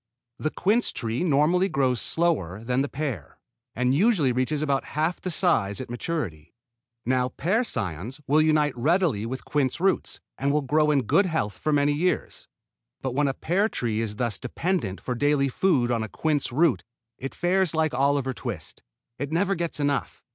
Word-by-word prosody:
The 155 Hz, -, 0 dB
quince 210 Hz, +9 st, +1 dB
tree 115 Hz, +5 st, -2 dB
normally 170 Hz, +4 st, +3 dB
grows 130 Hz, -5 st, +1 dB
slower 115 Hz, -, 0 dB
than 125 Hz, +2 st, 0 dB
the 140 Hz, -, -1 dB
pear, 135 Hz, -, -5 dB, 0.4 s
and 125 Hz, +2 st, +1 dB
usually 170 Hz, -, +3 dB
reaches 130 Hz, +5 st, 0 dB
about 140 Hz, -2 st, +1 dB
half 160 Hz, +3 st, 0 dB
the 185 Hz, -, -3 dB
size 155 Hz, -, +1 dB
at 130 Hz, -2 st, -6 dB
maturity. 115 Hz, -, -4 dB, 0.5 s
Now 125 Hz, +1 st, +1 dB
pear 190 Hz, -, 0 dB
cions 110 Hz, -, -3 dB
will 150 Hz, +3 st, +4 dB
unite 155 Hz, -3 st, +2 dB
readily 140 Hz, -, +1 dB
with 130 Hz, +2 st, -6 dB
quince 145 Hz, -1 st, 0 dB
roots 190 Hz, +1 st, 0 dB, 0.2 s
and 140 Hz, +1 st, +1 dB
will 150 Hz, 0 st, +1 dB
grow 150 Hz, +3 st, +2 dB
in 140 Hz, -3 st, +3 dB
good 195 Hz, -, +3 dB
health 130 Hz, -, -1 dB
for 155 Hz, -, 0 dB
many 145 Hz, 0 st, +3 dB
years. 175 Hz, +5 st, -2 dB, 0.6 s
But 130 Hz, -2 st, -2 dB
when 145 Hz, +2 st, +2 dB
a 135 Hz, -, -1 dB
pear 195 Hz, +6 st, +1 dB
tree 115 Hz, -, -2 dB
is 105 Hz, -2 st, -3 dB
thus 115 Hz, -3 st, -2 dB
dependent 130 Hz, -, -2 dB
for 125 Hz, -, -3 dB
daily 140 Hz, +2 st, +2 dB
food 130 Hz, -5 st, +2 dB
on 115 Hz, -2 st, +1 dB
a 110 Hz, -, -4 dB
quince 150 Hz, +1 st, -1 dB
root 150 Hz, +1 st, +2 dB, 0.4 s
it 135 Hz, -, -6 dB
fares 180 Hz, -1 st, +1 dB
like 160 Hz, -1 st, +1 dB
Oliver 140 Hz, -1 st, +1 dB
Twist. 100 Hz, -12 st, -7 dB, 0.4 s
It 140 Hz, +2 st, -3 dB
never 190 Hz, +4 st, +2 dB
gets 170 Hz, -4 st, -2 dB
enough. 145 Hz, -1 st, -1 dB
140 Hz, 175 wpm, -25 LUFS, 125-165 Hz, 0.6 s, will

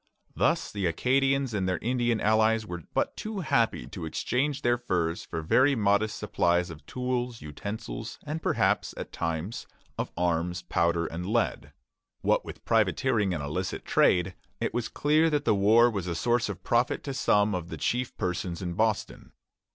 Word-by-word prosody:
Thus -, -, +1 dB
the 100 Hz, -3 st, -1 dB
Acadians 135 Hz, -, +1 dB
and 95 Hz, -3 st, 0 dB
their 90 Hz, -, 0 dB
Indian 120 Hz, 0 st, 0 dB
allies 110 Hz, +1 st, +3 dB
were 90 Hz, -3 st, -6 dB
but -, -, 0 dB
too 215 Hz, -2 st, -4 dB
happy 115 Hz, -, +1 dB
to 85 Hz, +3 st, -6 dB
exchange 135 Hz, -, -1 dB
their 120 Hz, 0 st, +2 dB
furs 90 Hz, -7 st, -1 dB
for 80 Hz, -, -5 dB
very 135 Hz, -, +4 dB
modest 105 Hz, -1 st, +2 dB
supplies 85 Hz, 0 st, +1 dB
of 80 Hz, -, -11 dB
tools, 125 Hz, -3 st, -3 dB
utensils, 105 Hz, +8 st, -6 dB
and 155 Hz, +2 st, -4 dB
perhaps, -, -, +1 dB
at -, -, -6 dB
times, 85 Hz, +5 st, -3 dB, 0.3 s
of -, -, -1 dB
arms, 90 Hz, +1 st, 0 dB
powder, 85 Hz, -1 st, +1 dB
and 85 Hz, +3 st, -5 dB
lead. 115 Hz, +2 st, 0 dB, 0.5 s
What -, -, +2 dB
with -, -, -10 dB
privateering 105 Hz, -3 st, +2 dB
and 80 Hz, -5 st, -2 dB
illicit 90 Hz, +6 st, -3 dB
trade, 90 Hz, +1 st, +3 dB, 0.3 s
it 115 Hz, -, -2 dB
was 120 Hz, -2 st, -1 dB
clear 155 Hz, +2 st, +2 dB
that 150 Hz, -2 st, 0 dB
the -, -, +4 dB
war 110 Hz, +4 st, +5 dB
was 100 Hz, -6 st, -2 dB
a 85 Hz, -, -2 dB
source 120 Hz, +4 st, +1 dB
of 95 Hz, -2 st, -6 dB
profit 120 Hz, +1 st, +1 dB
to 140 Hz, -, -4 dB
some 105 Hz, -4 st, +2 dB
of 90 Hz, -2 st, -4 dB
the -, -, -6 dB
chief 125 Hz, +1 st, -1 dB
persons 90 Hz, -2 st, -2 dB
in 90 Hz, -1 st, -3 dB
Boston. 110 Hz, +2 st, -1 dB
105 Hz, 170 wpm, -28 LUFS, 90-120 Hz, 0.5 s, war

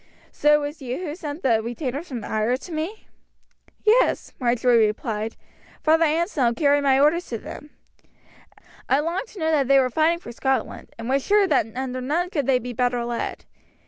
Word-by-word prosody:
So 300 Hz, 0 st, +4 dB
it 295 Hz, -1 st, 0 dB
was 295 Hz, +1 st, -7 dB
you 285 Hz, +5 st, -4 dB
sent 310 Hz, -1 st, -7 dB
the 225 Hz, -4 st, +3 dB
retainers 260 Hz, +7 st, -4 dB
from 245 Hz, -7 st, -6 dB
Ayr 220 Hz, +4 st, 0 dB
to 340 Hz, -, -11 dB
me?" 330 Hz, +7 st, -4 dB, 0.8 s
"Yes," 445 Hz, +3 st, +3 dB
Marjory 240 Hz, -2 st, +3 dB
replied. 215 Hz, +1 st, -3 dB, 0.5 s
"Father 320 Hz, +1 st, +4 dB
Anselm 305 Hz, -, +1 dB
carried 285 Hz, +1 st, +3 dB
my 270 Hz, -1 st, +3 dB
orders 310 Hz, +5 st, +3 dB
to 230 Hz, -, -4 dB
them. 295 Hz, +6 st, -10 dB, 1.2 s
I 270 Hz, -, +4 dB
longed 340 Hz, +9 st, -2 dB
to 425 Hz, -, -12 dB
know 320 Hz, 0 st, +1 dB
that 285 Hz, -4 st, +2 dB
they 275 Hz, 0 st, +5 dB
were 255 Hz, -1 st, +2 dB
fighting 320 Hz, +5 st, +2 dB
for 340 Hz, -, -10 dB
Scotland, 265 Hz, +3 st, -2 dB
and 230 Hz, 0 st, -6 dB
was 270 Hz, +1 st, +1 dB
sure 410 Hz, 0 st, +4 dB
that 295 Hz, -, +2 dB
under 255 Hz, 0 st, -3 dB
none 335 Hz, +8 st, -1 dB
could 290 Hz, -8 st, -1 dB
they 265 Hz, -2 st, +4 dB
be 250 Hz, 0 st, -6 dB
better 245 Hz, 0 st, 0 dB
led." 235 Hz, 0 st, -4 dB
275 Hz, 180 wpm, -23 LUFS, 245-320 Hz, 1.2 s, they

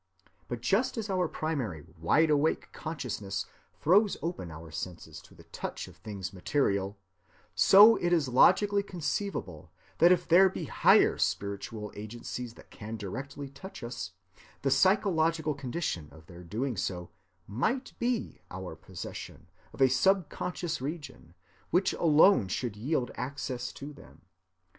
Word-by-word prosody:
But 120 Hz, -2 st, -5 dB
just 230 Hz, -, +1 dB
as 215 Hz, -3 st, -3 dB
our 180 Hz, -2 st, +1 dB
primary 130 Hz, -, -3 dB
wide‐awake 150 Hz, -, +1 dB
consciousness 120 Hz, -11 st, -4 dB, 0.3 s
throws 200 Hz, +6 st, +4 dB
open 165 Hz, -, -3 dB
our 80 Hz, 0 st, -10 dB
senses 85 Hz, +2 st, -7 dB
to -, -, -19 dB
the -, -, -15 dB
touch -, -, -6 dB
of -, -, -14 dB
things 100 Hz, -3 st, -6 dB
material, 100 Hz, -2 st, 0 dB, 0.6 s
so 200 Hz, -, +8 dB
it 175 Hz, -, 0 dB
is 165 Hz, -5 st, +3 dB
logically 200 Hz, +10 st, +5 dB
conceivable 175 Hz, -, -4 dB, 0.3 s
that 170 Hz, +2 st, +7 dB
if 180 Hz, -1 st, +2 dB
there 185 Hz, +3 st, +7 dB
be -, -, -5 dB
higher -, -, +4 dB
spiritual 105 Hz, +2 st, -2 dB
agencies 115 Hz, +2 st, -6 dB
that -, -, -17 dB
can 110 Hz, +2 st, -7 dB
directly 135 Hz, +8 st, -6 dB
touch 140 Hz, +3 st, -10 dB
us, 95 Hz, -7 st, -5 dB, 0.5 s
the 135 Hz, -, +2 dB
psychological 165 Hz, -1 st, +3 dB
condition 135 Hz, -, -3 dB
of 80 Hz, 0 st, -16 dB
their 90 Hz, +1 st, -12 dB
doing 115 Hz, +9 st, -3 dB
so 90 Hz, -1 st, -3 dB, 0.3 s
might 220 Hz, -, -1 dB
be 240 Hz, -, -2 dB
our 90 Hz, -2 st, -7 dB
possession 85 Hz, +2 st, -9 dB, 0.2 s
of -, -, -9 dB
a -, -, +7 dB
subconscious 175 Hz, +3 st, 0 dB
region 145 Hz, -, -7 dB, 0.3 s
which 180 Hz, +3 st, +2 dB
alone 160 Hz, -, +5 dB
should 115 Hz, +2 st, -3 dB
yield 125 Hz, +3 st, -1 dB
access 125 Hz, -1 st, -4 dB
to 145 Hz, +2 st, -8 dB
them. 140 Hz, -, -17 dB
135 Hz, 135 wpm, -30 LUFS, -, 0.6 s, so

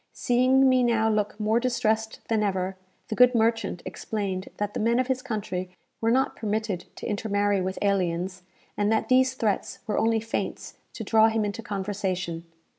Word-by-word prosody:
Seeing 255 Hz, +2 st, +3 dB
me 255 Hz, -1 st, +4 dB
now 230 Hz, -2 st, +2 dB
look 210 Hz, 0 st, -1 dB
more 215 Hz, +2 st, +2 dB
distressed 220 Hz, -3 st, 0 dB
than 225 Hz, -2 st, +1 dB
ever, 190 Hz, -2 st, -1 dB, 0.3 s
the -, -, -2 dB
good 250 Hz, +2 st, +5 dB
merchant 225 Hz, -5 st, +1 dB
explained 195 Hz, -3 st, -4 dB
that 205 Hz, 0 st, -2 dB
the -, -, -3 dB
men 235 Hz, +2 st, +2 dB
of 255 Hz, -, +2 dB
his 260 Hz, 0 st, -1 dB
country 205 Hz, -7 st, -4 dB, 0.3 s
were 225 Hz, -, +2 dB
not 260 Hz, +3 st, +2 dB
permitted 215 Hz, -4 st, -2 dB
to -, -, -8 dB
intermarry 205 Hz, -2 st, 0 dB
with 185 Hz, +1 st, -3 dB
aliens, 185 Hz, -2 st, 0 dB, 0.3 s
and 205 Hz, +1 st, +1 dB
that 220 Hz, -, +1 dB
these 260 Hz, 0 st, +4 dB
threats 215 Hz, -6 st, -1 dB
were 215 Hz, -, 0 dB
only 225 Hz, 0 st, +2 dB
feints 225 Hz, +1 st, -4 dB, 0.2 s
to 225 Hz, -, -6 dB
draw 220 Hz, +1 st, +5 dB
him 220 Hz, -1 st, 0 dB
into 205 Hz, +2 st, -4 dB
conversation. 190 Hz, -5 st, -3 dB
215 Hz, 175 wpm, -26 LUFS, 200-230 Hz, 0.3 s, good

